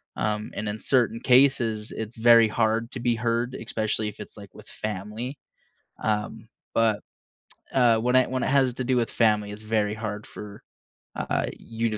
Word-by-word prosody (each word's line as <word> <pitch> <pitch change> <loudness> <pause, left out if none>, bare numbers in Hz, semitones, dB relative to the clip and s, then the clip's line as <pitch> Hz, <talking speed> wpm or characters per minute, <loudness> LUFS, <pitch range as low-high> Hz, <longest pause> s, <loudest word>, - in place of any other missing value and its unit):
um, 105 0 -2
and 105 0 -3
in 105 +1 -4
certain 115 -4 +2
cases, 125 -4 +3
it's 110 +1 -6
very 115 0 +7
hard 115 +1 0
to 130 - -6
be 120 -1 +1
heard, 120 +1 -1
especially 110 -1 -2
if - - -13
it's, - - -11
like, 100 -2 -12
with - - -13
family, 110 +6 -5 0.7
um, 110 +1 -2 0.2
but, 110 -2 +2 1.0
when 125 +1 +1
it 130 - +3
when 130 -1 -1
it - - 0
has 130 -2 +3
to 130 - -3
do 125 0 +1
with 115 -2 +1
family, 105 -3 +2
it's 105 +1 -9
very 105 -1 0
hard 105 -1 -5
for, 105 -1 -10 0.5
uh, - - -1
you 115 0 -3
to 110 - -3
110 Hz, 175 wpm, -25 LUFS, 105-120 Hz, 1.0 s, very